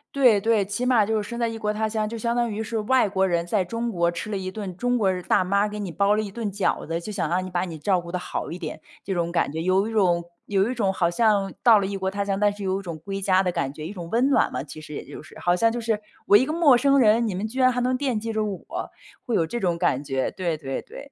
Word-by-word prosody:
对 245 -7 +5
对， 220 -1 +2
起 205 +5 -3
码 235 -5 +4
就 220 0 0
是 205 - -7
身 235 - -5
在 235 - +1
异 225 - -5
国 210 -1 -1
他 220 0 -1
乡， 215 -1 -1
就 230 +1 -5
相 235 +1 -1
当 240 -1 +1
于 215 +1 -3
是 225 +1 -3
外 225 0 +2
国 190 -1 +1
人 170 -1 0
在 190 +1 0
中 230 +5 -3
国 170 -2 +1
吃 170 +5 -5
了 200 - -1
一 185 0 -4
顿 190 -3 -6
中 245 +2 +1
国 200 -5 +2
的 180 -1 -3
大 185 - +2
妈 200 +3 +2
给 210 0 -6
你 195 -4 -4
包 200 +3 +2
了 215 - +1
一 200 -2 -5
顿 225 -1 -3
饺 200 -5 -1
子， 165 +1 -2
就 215 - -6
想 200 -3 -2
让 185 +2 0
你 - - -6
把 175 0 -1
你 165 -3 -7
照 180 +4 +1
顾 170 +1 -9
得 - - +1
好 180 - -4
一 170 - -5
点， 160 -4 -6 0.2
这 195 - -3
种 170 -1 -1
感 170 -4 0
觉。 160 - -3
有 185 +3 +2
一 - - -6
种 180 -5 +2 0.2
有 200 +2 +1
一 - - -2
种 200 -6 0
好 170 -2 +1
像 205 0 +2
到 225 -3 +7
了 195 - -1
异 195 0 -3
国 190 0 -1
他 200 +1 -2
乡， 195 -1 -1
但 210 0 +4
是 205 -1 -8
有 190 0 0
一 - - -7
种 170 -4 -6
归 195 +4 -5
家 190 0 +3
的 180 - 0
感 135 -4 -2
觉。 155 +1 -8
一 180 - -5
种 175 -4 -8
温 245 +4 +2
暖 280 - +3
嘛， 130 +2 -2
其 155 +1 -10
实 155 -1 -10
也 - - -5
就 - - -10
是。 - - -14
好 175 - +2
像 225 +6 +3
就 235 +1 -3
是， 220 -2 0 0.3
我 205 - +8
一 260 - +2
个 305 - -3
陌 305 -7 +5
生 280 +2 +3
人， 230 -2 +4
你 195 - -2
们 195 +4 -2
居 255 +5 -5
然 255 0 +6
还 250 0 -1
能 255 +1 +1
惦 260 -4 -1
记 225 +1 -3
着 220 0 -1
我， 255 - -5 0.4
会 240 - -1
有 165 - +2
这 240 +9 -4
种 175 -4 0
感 170 -6 +1
觉， 135 -2 -2
对 175 -4 -2
对 135 -3 -4
对。 - - -12
200 Hz, 340 characters per minute, -24 LUFS, 180-225 Hz, 0.4 s, 我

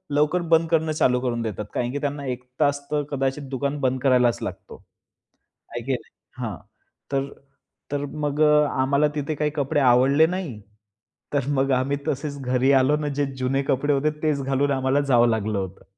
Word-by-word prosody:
लवकर 150 +4 +2
बंद 165 0 +4
करणं, 160 -1 +1
चालू 125 -5 +2
करून 120 -2 -1
देतात 105 -2 -4
कारण, 120 0 -1
की 145 - -3
त्यांना 145 -1 -3
एक 125 -1 -4 0.2
तास 145 -1 +2
तर 150 -1 +1
कदाचित 135 0 -2
दुकान 140 +2 -2
बंद 130 0 +1
करायलाच 125 -3 +3
लागतो. - - -7 0.9
आहे 120 0 -5
की 135 - 0
नाही. 125 - -6 0.3
हां, 110 -5 -3 0.6
तर, 135 0 0 0.7
तर 145 0 -1 0.2
मग 145 +1 -1 0.3
आम्हाला 140 +3 +2
तिथे 150 +1 -2
काही 150 +1 -1
कपडे 145 0 0
आवडले 135 +4 +5
नाही. 170 - -4 0.7
तर 140 -2 0
मग 135 0 +2
आम्ही 130 +2 +1
तसेच 140 0 -3
घरी 130 +1 +2
आलो 145 +3 +2
ना 150 -1 -3
जे 145 - +3
जुने 130 +2 0
कपडे 140 +2 +1
होते 145 +2 +2
तेच 150 -3 +1
घालून 135 +1 +1
आम्हाला 130 +1 +1
जावं 120 -4 +4
लागलं 110 -2 -1
होतं. 95 0 -6
135 Hz, 175 wpm, -24 LUFS, 125-145 Hz, 0.9 s, आवडले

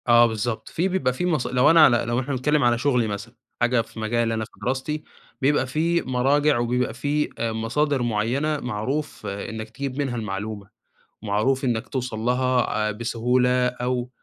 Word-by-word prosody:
آه، 120 0 +7
بالضبط، 110 +1 -3
في 175 +4 0
بيبقى 160 -10 0
في 180 - -2
مص 155 -7 0
لو 125 +3 +4
أنا 165 -2 +8
على 120 - +5
لو 120 +1 0
إحنا 135 +2 -3
بنتكلم 150 +3 +1
على 120 -1 +3
شغلي 125 -3 +1
مثلًا، 105 +3 -6 0.3
حاجة 120 0 +3
في 115 0 -11
مجالي 115 +1 0
أنا 110 -1 -2
في - - -21
دراستي، 135 +4 -2 0.4
بيبقى 135 -1 +2
في 165 +5 +1
مراجع 135 +3 +2
وبيبقى 120 0 0
في 145 +4 -1
مصادر 115 +5 0
معيّنة 120 +7 0
معروف 125 +3 -3
إنك 110 +2 -5
تجيب 135 +3 -5
منها 135 -4 -1
المعلومة، 105 -2 -5 0.5
معروف 110 +6 +1
إنك 115 -3 -1
توصل 125 -4 -3
لها 125 +2 +1 0.2
آآ، - - -1
بسهولة 125 +3 +1
أو 125 0 -2
125 Hz, 170 wpm, -24 LUFS, 115-135 Hz, 0.5 s, أنا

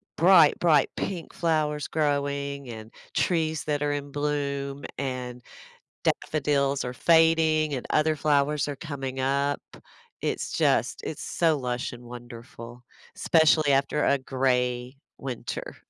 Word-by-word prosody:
bright, 170 -3 +6
bright 155 -5 +4
pink 180 -4 -4
flowers 155 -3 0
growing, 140 -2 -1
and 110 -1 -9 0.2
trees 160 -3 0
that 150 -1 -1
are 145 - +1
in 145 -1 -4
bloom, 140 -1 -2
and 125 -2 -4 0.6
daffodils 140 -2 0
are 125 - -4
fading, 160 0 +3
and 130 - -4
other 155 0 +2
flowers 145 -1 +1
are 145 - -3
coming 135 -3 -5
up. 140 +2 0 0.6
It's - - -2
just - - +1
it's - - -5
so 165 -3 +1
lush 125 -2 -3
and 120 - -10
wonderful, 120 0 -10 0.3
especially 155 -3 +4
after 140 +2 +1
a 140 - +3
gray 125 -1 -1 0.2
winter. 130 -4 -6
140 Hz, 125 wpm, -26 LUFS, 130-155 Hz, 0.6 s, bright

